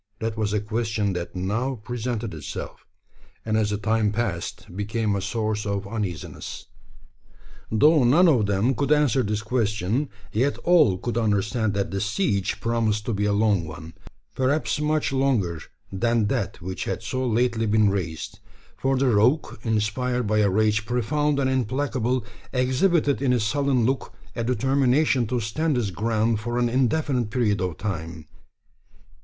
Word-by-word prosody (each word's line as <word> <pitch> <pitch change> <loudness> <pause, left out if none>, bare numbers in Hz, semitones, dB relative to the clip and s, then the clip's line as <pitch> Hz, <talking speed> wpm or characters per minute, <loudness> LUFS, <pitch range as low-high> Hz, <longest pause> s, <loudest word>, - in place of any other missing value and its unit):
That 110 0 -3
was 110 -2 -1
a 105 - +1
question 110 -1 -1
that 90 0 -5
now 110 +9 -1
presented 115 -1 -4
itself; 75 -3 -7 0.6
and 110 -1 0
as 110 -2 +2
the 105 - -1
time 110 0 +1
passed, 100 -5 -4
became 105 +1 -1
a 100 - -2
source 110 +1 -2
of 100 0 -2
uneasiness. 100 -6 -5 1.1
Though 150 +6 +5
none 155 +10 +5
of 120 -10 +3
them 100 +6 +2
could 140 +4 -1
answer 150 -3 +4
this 105 -1 -2
question, 110 +2 0 0.2
yet 130 +6 +1
all 165 - +5
could 120 +4 -2
understand 110 0 0
that 100 -1 -1
the 100 0 -2
siege 100 - 0
promised 110 -2 0
to 120 - -1
be 105 0 0
a 105 - +2
long 100 -3 +2
one 80 +1 -9 0.4
perhaps 140 +4 0
much 150 -2 0
longer 115 -12 +1 0.3
than 115 +3 +1
that 115 -7 -2
which 95 +1 -4
had - - -3
so 130 +3 -2
lately 115 -1 +1
been 105 -1 +3
raised: 95 +1 -4 0.4
for 135 0 +1
the 135 - +2
rogue, 120 +7 +2
inspired 115 +3 0
by 105 +1 +1
a 105 -1 +4
rage 110 +2 +2
profound 140 +6 0
and 135 -2 +1
implacable, 130 -1 0 0.3
exhibited 135 +3 +2
in 135 -2 +2
his 120 -3 +2
sullen 130 +1 +1
look 130 +2 -2 0.2
a 115 - -2
determination 130 +1 +2
to 125 +2 -1
stand 145 +8 -1
his 115 -6 -1
ground 110 +3 0
for 120 +2 -3
an 120 -1 +2
indefinite 125 -1 +1
period 105 -5 +1
of 90 -4 -2
time. 80 -5 -5
110 Hz, 160 wpm, -24 LUFS, 105-130 Hz, 1.1 s, Though